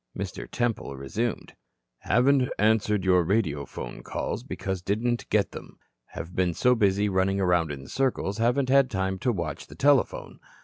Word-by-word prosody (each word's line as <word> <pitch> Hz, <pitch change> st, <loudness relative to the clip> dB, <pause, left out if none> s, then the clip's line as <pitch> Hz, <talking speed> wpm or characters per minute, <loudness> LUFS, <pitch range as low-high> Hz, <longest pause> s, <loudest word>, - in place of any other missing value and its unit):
Mr. -, -, -5 dB
Temple 115 Hz, -12 st, -2 dB
resumed: 100 Hz, -, -3 dB, 0.5 s
"Haven't 130 Hz, +4 st, +3 dB
answered 105 Hz, -2 st, +2 dB
your 90 Hz, -1 st, +4 dB
radiophone 80 Hz, -, -2 dB
calls -, -, -4 dB
because 95 Hz, -8 st, -4 dB
didn't 115 Hz, +6 st, -1 dB
get 105 Hz, -2 st, +2 dB
them. -, -, -10 dB, 0.3 s
Have 85 Hz, +2 st, -8 dB
been 90 Hz, -2 st, +1 dB
so 125 Hz, 0 st, +4 dB
busy 100 Hz, -3 st, +2 dB
running 95 Hz, 0 st, +1 dB
around 90 Hz, -4 st, +2 dB
in 70 Hz, -2 st, -7 dB
circles, 120 Hz, -, -1 dB
haven't 125 Hz, +3 st, +2 dB
had 135 Hz, -1 st, +5 dB
time 95 Hz, -3 st, -2 dB
to 125 Hz, -, +1 dB
watch 85 Hz, -8 st, -4 dB
the 70 Hz, -, -12 dB
telephone. 140 Hz, -, +1 dB
100 Hz, 150 wpm, -26 LUFS, 90-120 Hz, 0.5 s, had